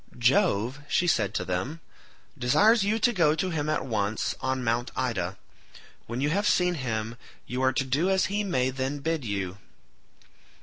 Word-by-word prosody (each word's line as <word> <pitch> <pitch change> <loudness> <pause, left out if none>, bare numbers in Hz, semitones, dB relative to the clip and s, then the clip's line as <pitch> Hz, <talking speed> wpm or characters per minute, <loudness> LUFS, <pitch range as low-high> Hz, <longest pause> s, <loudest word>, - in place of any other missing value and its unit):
"Jove," 125 - +2
she 180 - +2
said 110 - +1
to 90 - -1
them, 95 - -3 0.6
"desires 175 - +4
you 210 +3 +1
to 240 +2 +2
go 160 -6 +3
to 185 +2 -1
him 155 -2 -1
at 155 - 0
once 110 -3 -1
on 130 -1 -1
Mt. 120 +1 0
Ida; 100 -8 -2 0.7
when 120 +3 -3
you 145 +2 +1
have 200 +4 +1
seen 180 0 +3
him 115 -6 -3 0.3
you 125 +1 -3
are 130 0 +3
to 135 - 0
do 145 +8 +1
as 190 0 +3
he 205 +2 -1
may 130 -10 0
then 135 +2 -2
bid 160 +1 -2
you." 100 -3 -3
130 Hz, 175 wpm, -27 LUFS, 115-170 Hz, 0.7 s, desires